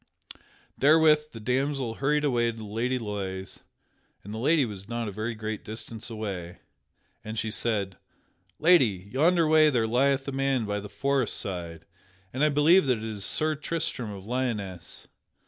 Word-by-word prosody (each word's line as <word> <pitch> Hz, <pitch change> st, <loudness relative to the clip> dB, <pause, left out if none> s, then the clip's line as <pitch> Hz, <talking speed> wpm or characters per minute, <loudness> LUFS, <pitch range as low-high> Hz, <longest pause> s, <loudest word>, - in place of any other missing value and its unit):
Therewith 150 Hz, +1 st, +5 dB
the 115 Hz, -, -9 dB
damsel 130 Hz, +1 st, -1 dB
hurried 150 Hz, +4 st, +1 dB
away 120 Hz, -4 st, +2 dB
to 115 Hz, -, -13 dB
the 110 Hz, -, -7 dB
Lady 115 Hz, +5 st, -1 dB
Loise 95 Hz, -4 st, -5 dB, 0.6 s
(and 105 Hz, -, -8 dB
the 110 Hz, -, -4 dB
lady 150 Hz, +3 st, +3 dB
was 100 Hz, -2 st, -8 dB
not 120 Hz, -1 st, -2 dB
a -, -, -4 dB
very 110 Hz, +3 st, -3 dB
great 110 Hz, -1 st, -5 dB
distance 110 Hz, +2 st, -7 dB
away) 100 Hz, -6 st, -5 dB, 0.7 s
and 110 Hz, +1 st, -6 dB
she 110 Hz, 0 st, -2 dB
said: 100 Hz, -5 st, -1 dB, 0.6 s
"Lady, 115 Hz, -, +3 dB
yonder 165 Hz, +4 st, +3 dB
way 155 Hz, 0 st, +6 dB
there 120 Hz, -5 st, +1 dB
lieth 135 Hz, +4 st, +2 dB
a -, -, -2 dB
man 135 Hz, -3 st, 0 dB
by 105 Hz, 0 st, -2 dB
the 105 Hz, 0 st, -8 dB
forest 135 Hz, +3 st, 0 dB
side 85 Hz, -3 st, -5 dB, 0.5 s
and 130 Hz, +3 st, 0 dB
I 150 Hz, -, +5 dB
believe 150 Hz, +3 st, +5 dB
that 125 Hz, -3 st, +2 dB
it 110 Hz, -, -8 dB
is 110 Hz, -3 st, -5 dB
Sir 155 Hz, +9 st, +1 dB
Tristram 155 Hz, -6 st, -3 dB
of 100 Hz, -2 st, -8 dB
Lyonesse. 105 Hz, -8 st, -4 dB
115 Hz, 165 wpm, -27 LUFS, 105-140 Hz, 0.7 s, way